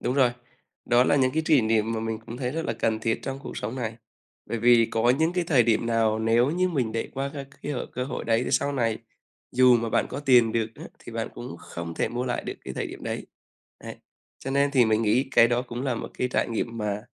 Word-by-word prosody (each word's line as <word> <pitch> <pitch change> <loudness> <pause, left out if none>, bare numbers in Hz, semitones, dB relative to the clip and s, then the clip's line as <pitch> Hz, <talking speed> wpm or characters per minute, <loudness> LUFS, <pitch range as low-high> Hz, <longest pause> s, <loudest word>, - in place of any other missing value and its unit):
Đúng 125 - -1
rồi, 130 -3 +4 0.5
đó 120 +1 +4
là 145 - +3
những 130 -2 +3
cái 160 - +1
kỷ 150 -4 +5
niệm 110 0 +1
mà 110 - -2
mình 110 0 -3
cũng 115 - -7
thấy 125 -1 -2
rất 165 +1 -3
là - - -1
cần 110 -1 0
thiết 115 0 0
trong 135 0 -4
cuộc - - -8
sống 110 +4 -4
này. 115 -3 -3 0.5
Bởi 115 - -3
vì 120 0 +5
có 115 +2 +2
những 160 +2 +2
cái 180 -1 0
thời 145 -7 +4
điểm 115 0 +1
nào 115 -2 +2
nếu 115 +4 +3
như 180 +3 +1
mình 130 -10 -1
để 115 - -2
qua 135 +1 -3
các 140 -1 -7
cái 145 - -3
hội 125 - -3
cơ 125 - -2
hội 130 - -5
đấy 115 +1 +2
thì - - -3
sau 140 0 +1
này 115 -5 0 0.5
dù 125 -1 +6
mà 115 0 -2
bạn - - +2
có - - -5
tiền 125 -5 +4
được 115 -1 +1
á - - -10
thì - - -11
bạn - - -3
cũng - - -7
không 85 -1 -7
thể - - 0
mua 120 +2 -3
lại 120 -1 -2
được - - -4
cái - - -6
thời - - -2
điểm - - -10
đấy. - - -4 0.5
Ấy, - - -9 0.4
cho 135 - -6
nên 140 +1 +2
thì 130 -4 +4
mình 110 0 +2
nghĩ 120 +5 +2
cái 115 - +6
đó 120 +1 +1
cũng 120 0 -6
là 135 -3 0
một - - -6
cái 125 - 0
trải - - 0
nghiệm 115 0 -3
mà 105 -1 -2
120 Hz, 265 wpm, -26 LUFS, 115-135 Hz, 0.5 s, dù